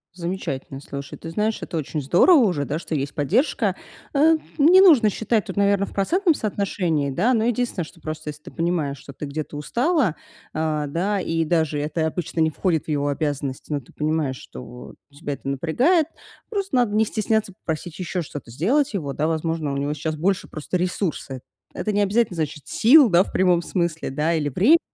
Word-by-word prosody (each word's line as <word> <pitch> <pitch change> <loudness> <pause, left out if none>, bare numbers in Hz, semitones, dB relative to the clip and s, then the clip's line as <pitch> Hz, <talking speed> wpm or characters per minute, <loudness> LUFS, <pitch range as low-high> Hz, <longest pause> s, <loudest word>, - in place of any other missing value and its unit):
Замечательно. 170 -7 -4
Слушай, 140 0 -7
ты 165 - -7
знаешь, 210 +5 -1
это 165 - -4
очень 150 0 -3
здорово 185 - +5
уже, 180 - +2
да, 150 +3 -2
что 160 - -4
есть 140 0 -2
поддержка. 185 - +1 0.4
А, 310 +3 +5 0.2
не 345 +6 +7
нужно 280 - +7
считать 220 0 0
тут, 190 - -6
наверно, 200 0 +2
в - - -12
процентном 340 - +2
соотношении, 180 - -1
да. 220 - +2
Но 220 -1 +2
единственное, 240 -7 -1
что, 165 - -16
просто 155 -1 -5
если 150 0 -9
ты - - -10
понимаешь, 165 -5 -1
что 140 - -12
ты 150 - -6
где-то 150 +1 -5
устала, 240 - +1 0.4
а, 155 -2 -1
да, 190 +7 -1
и 165 -2 -1
даже 160 -2 +1
это 160 +2 -1
обычно 170 0 -4
не 160 0 +4
входит 165 0 -1
в - - -28
его 145 -1 0
обязанности, 145 -1 -3
но 145 - 0
ты - - -21
понимаешь, 150 -4 -1
что 125 0 -11 0.2
тебя 145 0 -5
это 135 - -9
напрягает, 250 - +2 0.4
просто 395 - -2
надо 235 -4 +2
не 220 +1 +4
стесняться 215 -2 -1
попросить 165 -2 -5
ещё 180 0 -2
что-то 145 -4 -9
сделать 225 - +1
его, 140 -7 -3
да. 155 +1 0
Возможно, 160 -2 -1
у - - -2
него 145 +2 -1
сейчас 155 +1 -3
больше 185 +5 0
просто 155 +4 -3
ресурсы. 175 -7 -2 0.3
Это 215 - -2
не 205 0 +1
обязательно 205 0 +2
значит 150 -3 -4
сил, 255 +2 +6
да, 175 +1 +6
в - - -11
прямом 180 -2 +3
смысле, 170 -5 -2
да, 150 +5 0
или 150 -3 0
времи 240 - +5
170 Hz, 195 wpm, -23 LUFS, 150-210 Hz, 0.4 s, не